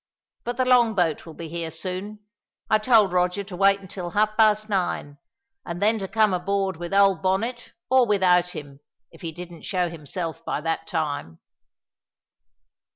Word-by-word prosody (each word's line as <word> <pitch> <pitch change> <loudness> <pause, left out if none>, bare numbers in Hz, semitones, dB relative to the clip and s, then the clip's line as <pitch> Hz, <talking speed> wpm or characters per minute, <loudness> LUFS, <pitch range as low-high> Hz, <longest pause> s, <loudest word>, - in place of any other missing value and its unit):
But 240 0 -4
the 255 - +2
long 240 -3 +4
boat 170 -4 0
will 160 - -10
be 165 - -7
here 165 0 -4
soon. 185 +6 -6 0.5
I 215 - +5
told 215 -4 +4
Roger 180 +2 +1
to 195 -2 -9
wait 195 +1 +3
until 185 -2 -6
half 215 +3 +1
past 215 -1 +4
nine, 175 -7 -2 0.4
and 170 0 -6
then 215 +3 +2
to 195 - -4
come 215 -1 +2
aboard 195 +1 -1
with 175 0 -6
old 195 -3 +4
Bonnet 225 +6 -1
or 260 -2 +4
without 180 -3 +3
him, 140 -2 -9 0.3
if - - -17
he 165 - -4
didn't 175 0 -10
show 180 -3 -1
himself 165 +1 -5
by - - -2
that 165 0 -2
time." 145 - -3
185 Hz, 165 wpm, -24 LUFS, 170-210 Hz, 0.5 s, I